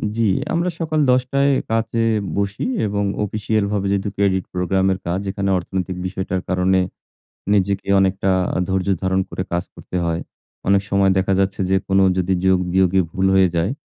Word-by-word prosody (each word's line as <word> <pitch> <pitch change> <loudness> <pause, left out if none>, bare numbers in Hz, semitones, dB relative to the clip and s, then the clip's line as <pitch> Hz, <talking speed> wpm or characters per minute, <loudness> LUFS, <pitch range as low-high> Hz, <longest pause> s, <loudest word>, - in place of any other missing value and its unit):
জ্বি, 115 -1 +2 0.3
আমরা 170 +2 +1
সকাল 155 -1 -1
১০ 125 - +4
টায় 140 +1 +3 0.2
কাজে 115 0 0 0.3
বসি 100 0 -2 0.2
এবং 100 0 -1 0.2
অফিসিয়ালভাবে 105 -1 -1
যেহেতু 100 +1 0
credit 95 -2 +1
program 95 +1 0
এর 95 - -6
কাজ 90 +2 0
এখানে 100 0 -2
অর্থনৈতিক 90 +1 -4
বিষয়টার 95 0 -3
কারণে 95 +1 +2 0.7
নিজেকে 100 0 0
অনেকটা 95 0 +1 0.4
ধৈর্য 95 0 -1 0.2
ধারণ 95 0 +1
করে 90 - -3
কাজ 85 +1 0
করতে 90 - -6
হয়। 85 0 -1 0.5
অনেক 100 0 +4
সময় 100 -1 +3
দেখা 95 +1 +1
যাচ্ছে 95 0 0
যে 95 - +3
কোনো 95 0 +3
যদি 95 +1 +1
যোগ 95 -1 +4
বিয়োগে 95 0 +3
ভুল 95 +1 0
হয়ে 95 -2 +5
যায়, 85 +6 +1
95 Hz, 165 wpm, -20 LUFS, 95-100 Hz, 0.7 s, হয়ে